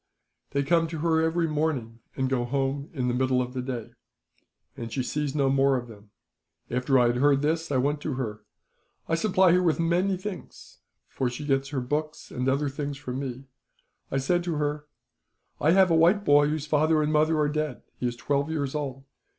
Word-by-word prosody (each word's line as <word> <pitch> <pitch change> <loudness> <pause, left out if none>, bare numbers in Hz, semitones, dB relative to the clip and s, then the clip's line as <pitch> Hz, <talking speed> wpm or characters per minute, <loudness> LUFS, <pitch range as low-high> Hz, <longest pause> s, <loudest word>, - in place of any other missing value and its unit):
They 140 0 0
come 165 +3 +2
to 160 0 -6
her 160 0 +2
every 165 +1 +1
morning, 145 -7 -2 0.2
and 130 -1 0
go 130 -2 0
home 135 +3 -2
in 130 -6 -2
the 120 - +1
middle 130 0 +1
of 125 0 -2
the 130 - -3
day, 125 -3 -5 0.8
and 115 -1 -6
she 130 - -1
sees 145 +2 -2
no 140 -2 +2
more 135 0 +3
of 120 -1 -5
them. 105 -2 -14 0.6
"After 125 +2 +2
I 125 - +5
had 120 +1 +2
heard 140 +1 +3
this, 160 +1 0
I 135 - +2
went 145 +3 0
to 150 - -3
her. 110 -5 -4 0.7
I - - -2
supply 185 +1 +4
her 180 +1 +4
with 165 -4 +1
many 180 +3 +1
things, 190 0 -9 0.3
for 130 - -2
she 125 +5 -6
gets 135 -1 0
her 135 -3 -2
books 150 +4 -3
and 125 +1 -1
other 140 +2 +1
things 140 0 -4
from 130 -2 -5
me. 130 -1 -5 0.7
I 135 - -1
said 175 +6 +1
to 170 -3 -1
her: 150 0 -2 0.7
"'I 150 - +2
have 190 -2 +5
a - - +5
white 175 +6 +4
boy 145 -1 +5
whose 150 -1 -2
father 155 +1 +2
and 150 +1 0
mother 155 +1 +3
are 150 -1 +2
dead. 155 -2 -3 0.2
He 125 - 0
is 120 - -3
twelve 140 +4 -1
years 145 -4 -2
old. 135 -3 -4
145 Hz, 205 wpm, -26 LUFS, 130-160 Hz, 0.8 s, I